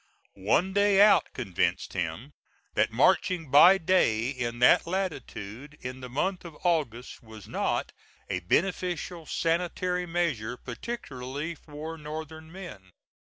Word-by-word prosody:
One 150 - +1
day 200 0 +4
out 210 +1 +6
convinced - - -1
him - - -4 0.4
that - - +2
marching 165 -7 +2
by 175 +7 +8
day 145 - +2
in 120 -3 -3
that 125 +6 +5
latitude, 150 - -5
in 130 +1 -7
the 125 - -7
month 180 +9 -1
of 165 -4 -10
August, 145 -9 -1
was 110 -3 -12
not - - -1 0.4
a 95 -2 -2
beneficial 175 - -1
sanitary 180 +2 -1
measure, 145 -10 -1
particularly 140 - -6
for 155 +1 -8
Northern 160 +1 -7
men. 165 - -10
160 Hz, 120 wpm, -28 LUFS, 125-180 Hz, 0.4 s, by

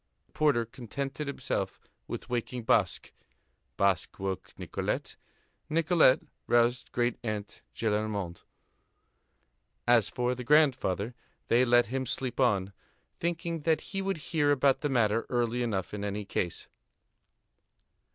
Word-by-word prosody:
The - - -36
porter 145 -7 +2
contented 135 +5 -5
himself 140 - -3 0.3
with - - -5
waking 120 0 -3
Basque. 110 -6 +1 0.7
Basque 100 -3 +1
woke 95 -1 -4
Nicolette; - - -3 0.5
Nicolette 160 -3 +4 0.2
roused 120 0 +2
great 120 -1 0
aunt 105 -3 -4
Gillenormand. 105 -5 -1 1.5
As 120 -4 +5
for 125 0 0
the 125 0 -6
grandfather, 125 -7 +3 0.4
they 120 +2 +5
let 120 0 +5
him 130 -1 -1
sleep 130 +2 -2
on, 100 -6 +2 0.5
thinking 170 -1 -2
that 160 +1 +1
he 195 - 0
would 195 -1 -1 0.2
hear 150 -3 +3
about 140 -1 +3
the 150 - 0
matter 115 -3 +2
early 120 0 0
enough 105 -7 -2
in 105 -1 -4
any 100 0 -3
case. 90 -3 -3
120 Hz, 120 wpm, -30 LUFS, 105-140 Hz, 1.5 s, As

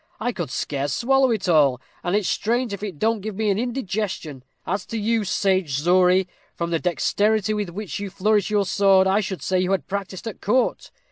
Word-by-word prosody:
I 245 +3 -1
could 175 - -4
scarce 140 +1 -2
swallow 270 +2 +3
it 220 -5 -1
all, 145 -7 +4 0.2
and 175 +2 0
it's 210 -3 +1
strange 235 +1 0
if 200 - -6
it 200 -7 -5
don't 220 +4 0
give 215 0 -5
me 215 0 +1
an 200 - 0
indigestion. 205 - -3 0.2
As 195 +1 -2
to 230 - -4
you, 220 +1 +1
sage 185 -7 0
Zory, 180 +3 +4 0.3
from 170 0 -3
the 165 - +1
dexterity 205 +6 +1
with 210 -3 -2
which 190 +1 -5
you 200 -1 -4
flourish 205 +1 +1
your 205 -1 +2
sword, 195 0 +4
I 190 +2 +3
should 190 -3 -4
say 185 -1 +1
you 185 +1 +1
had 185 -8 -1
practised 195 -1 -5
at 220 - -7
court. 250 +5 0
195 Hz, 205 wpm, -23 LUFS, 180-215 Hz, 0.3 s, all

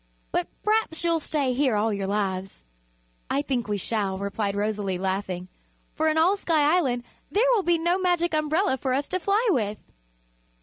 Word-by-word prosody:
But 175 - 0 0.2
p'raps 425 -7 +1
you'll 335 -1 +2
stay 290 -4 0
here 260 -3 +2
all 215 +1 +1
your 200 -1 -2
lives." 195 - -2 0.7
"I 280 - +1
think 250 -6 -1
we 205 -1 -1
shall," 200 -1 -1
replied 200 +1 -2
Rosalie, 205 -2 -1
laughing, 190 -1 -2 0.5
"for 315 - 0
in 315 0 +2
all 345 +5 +4
Sky 320 -5 +2
Island 250 -9 +1 0.3
there 430 +5 +2
will 445 - +3
be 345 -2 +2
no 345 +3 +1
Magic 350 -2 +1
Umbrella 310 +1 +1
for 260 0 -1
us 285 +1 -1
to 370 - 0
fly 405 +6 +1
with." 215 - 0
265 Hz, 175 wpm, -25 LUFS, 205-335 Hz, 0.7 s, all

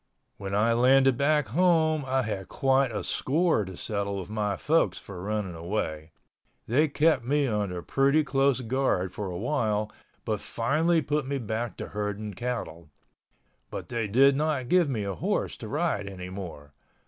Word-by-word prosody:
When 100 0 -4
I 115 +3 +3
landed 130 +2 +5
back 145 -1 +2
home 160 - +3
I 130 0 +1
had 100 -4 -4
quite 135 -1 +2
a 105 - -3
score 160 -3 +1
to 95 -1 -9
settle 100 -2 -2
with 95 +1 -6
my 105 -2 -1
folks 145 - +2
for 95 -3 -9
running 105 -2 -2
away. 80 -3 -4 0.5
They 145 +8 +3
kept 150 -2 +2
me 145 +3 +1
under 100 -7 -2
pretty 140 +3 +3
close 135 -2 +2
guard 115 -7 0
for 100 +1 -5
awhile 105 +1 -1 0.3
but 110 -3 -1
finally 155 +10 +1
put 150 -1 -1
me 140 0 -1
back 115 -1 -3
to - - -6
herding 105 0 -4
cattle—but 85 -10 -8
they 115 -3 -1
did 135 +6 +5
not 145 -4 -1
give 180 -4 +4
me 115 -6 -1
a 100 -1 -3
horse 90 - -1
to - - -8
ride 100 -1 -1
anymore. 90 -6 -8
115 Hz, 160 wpm, -27 LUFS, 100-140 Hz, 0.5 s, landed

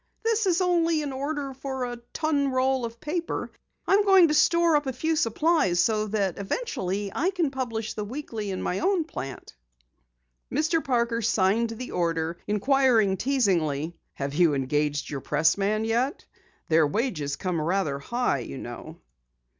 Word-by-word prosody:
"This 450 -2 +1
is 360 0 +2
only 335 -3 +2
an 280 -2 -4
order 280 0 -3
for 265 -1 -4
a 245 0 -5
ton 290 -3 0
roll 260 -1 +1
of 230 0 -8
paper. 330 +2 -3 0.3
I'm 400 +2 +4
trying 385 -4 +6
to - - +1
store 335 +1 +4
up 290 -1 +1
a 265 - -1
few 320 +6 0
supplies 230 - +2
so 215 +2 +2
that 200 -4 -1
eventually 200 - -3
I 355 - +1
can 350 -7 -1
publish 230 -5 -3
the 210 - -4
Weekly 225 -3 -5
in 190 - -3
my 180 - -1
own 375 -1 +2
plant." 135 - -8 1.0
Mr. 315 +3 +1
Parker 235 -4 0
signed 215 +2 +2
the 230 +3 -6
order, 165 -1 -1
inquiring 220 -1 +3
teasingly: 175 - 0 0.2
"Have 140 0 -4
you 160 -2 +3
engaged 145 +2 -1
your 140 -2 -4
pressman 195 +10 +1
yet? 240 +5 -1 0.4
Their 160 -1 +4
wages 150 - -2
come 180 -4 -2
rather 165 -4 0
high 240 - -1
you 70 - -7
know." - - -8
230 Hz, 155 wpm, -26 LUFS, 180-295 Hz, 1.0 s, trying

